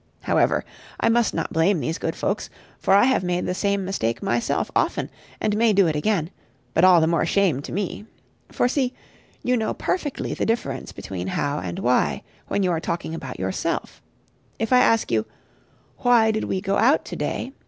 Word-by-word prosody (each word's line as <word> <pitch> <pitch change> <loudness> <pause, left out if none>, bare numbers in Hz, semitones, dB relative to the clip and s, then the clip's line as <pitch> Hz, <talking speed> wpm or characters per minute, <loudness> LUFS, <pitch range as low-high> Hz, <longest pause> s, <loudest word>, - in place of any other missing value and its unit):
However, - - +2 0.3
I - - +2
must 235 0 +3
not 165 - -3
blame 165 +3 +3
these 160 +3 -3
good - - -2
folks, - - -2 0.3
for 195 - +3
I 200 - +6
have 260 -6 +3
made 180 0 -1
the 180 - -1
same 200 0 0
mistake 115 -12 -2
myself 120 0 0
often, - - 0 0.3
and 210 -1 0
may 225 0 +3
do 195 -1 +5
it 160 -2 0
again: 170 +1 0 0.4
but 165 - +2
all 180 -2 +7
the - - +4
more 165 -1 +2
shame 175 -6 +2
to - - -8
me. 205 +3 -4 0.4
For - - +2
see 260 -1 0 0.5
you 250 - +2
know 220 -2 -1
perfectly 300 -7 -2
the - - -2
difference 230 +1 -2
between 95 -1 -6
How 145 +9 -1
and 90 -1 -5
Why, 125 +1 +1 0.2
when 200 - 0
you 180 - +2
are 165 - 0
talking 170 -1 -3
about 135 -6 -6
yourself. 95 0 -3 0.6
If 225 +3 -1
I 250 - +7
ask 225 - +3
you, 110 -1 +1 0.7
"Why 235 -3 +4
did 220 0 -2
we 190 - -2
go 195 0 0
out 265 +7 +3
to - - -6
day?" 260 - -3
190 Hz, 195 wpm, -23 LUFS, 160-220 Hz, 0.7 s, all